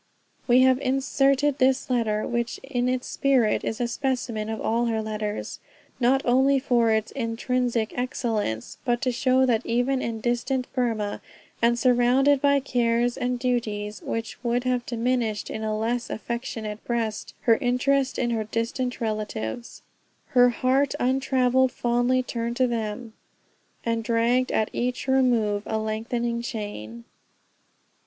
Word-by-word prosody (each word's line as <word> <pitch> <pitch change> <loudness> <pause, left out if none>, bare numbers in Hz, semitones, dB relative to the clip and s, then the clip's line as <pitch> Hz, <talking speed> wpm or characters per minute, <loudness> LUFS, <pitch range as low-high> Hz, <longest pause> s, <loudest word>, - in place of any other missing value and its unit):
We 250 0 +6
have 260 0 +4
inserted 270 +1 +1
this 260 +1 +2
letter, 225 -4 0
which 235 -1 -2
in 250 -2 -1
its 255 0 -1
spirit 260 -6 +2
is 220 - -3
a 240 - 0
specimen 235 -4 -2
of 220 -1 -3
all 235 +2 0
her 225 -1 0
letters, 215 -1 -4 0.4
not 265 +2 +3
only 265 +3 +4
for 245 -3 +2
its, 220 0 +1
intrinsic 235 -1 -1
excellence, 225 - -2
but 240 -2 +1
to 255 - +2
show 255 +2 +3
that 230 -4 +1
even 250 +3 0
in 230 -1 -3
distant 250 +3 -1
Burmah, 225 -5 -1 0.4
and 235 +1 +3
surrounded 255 +3 +3
by 280 -1 +4
cares 240 -2 +1
and 250 0 -1
duties 215 -5 -2
which 225 +1 -5
would 240 0 0
have 250 -1 -1
diminished 235 -3 -1
in 220 - -4
a 215 0 -1
less 235 +2 -1
affectionate 220 -2 -5
breast 225 -3 -3
her 230 -2 +4
interest 270 +1 +1
in 240 -1 0
her 220 -2 -1
distant 235 +3 -3
relatives, 215 - -4 0.5
"Her 245 -1 +5
heart 260 +3 +1
untravelled 260 0 +2
fondly 245 +1 +1
turned 235 -1 -3
to" 260 - +4
them, 225 -1 -3 0.7
"And 230 -1 0
dragged 235 +2 +1
at 215 - 0
each 250 +2 -2
remove 240 -6 +2
a 220 - -1
lengthening 235 +2 -2
chain." 205 - -6
240 Hz, 140 wpm, -25 LUFS, 225-255 Hz, 0.7 s, We